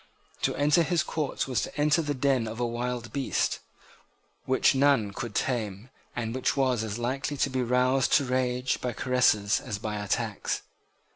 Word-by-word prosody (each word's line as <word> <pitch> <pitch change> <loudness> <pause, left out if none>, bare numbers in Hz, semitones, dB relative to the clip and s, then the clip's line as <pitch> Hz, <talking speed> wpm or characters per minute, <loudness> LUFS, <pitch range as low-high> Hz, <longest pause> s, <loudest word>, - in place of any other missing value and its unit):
To - - +1
enter 150 +4 +4
his 170 -1 +1
court 150 -4 -2
was 130 -3 0
to - - -6
enter 150 +3 +3
the 145 -2 -2
den 130 -3 +1
of 110 +2 -6
a 120 - +1
wild 120 0 -3
beast, 140 -2 0 0.9
which 130 - +3
none 135 -7 +3
could 115 0 -6
tame, 110 -2 -2 0.2
and 115 -2 -3
which 130 +2 0
was 130 -4 +2
as 110 0 -4
likely 130 +4 -2
to 135 - +1
be 130 -1 0
roused 125 +2 +2
to 140 - +4
rage 125 0 0
by 125 -1 -2
caresses 110 -5 +2
as 110 -5 -5
by 105 0 -4
attacks. 110 +1 -2
125 Hz, 170 wpm, -28 LUFS, 115-135 Hz, 0.9 s, enter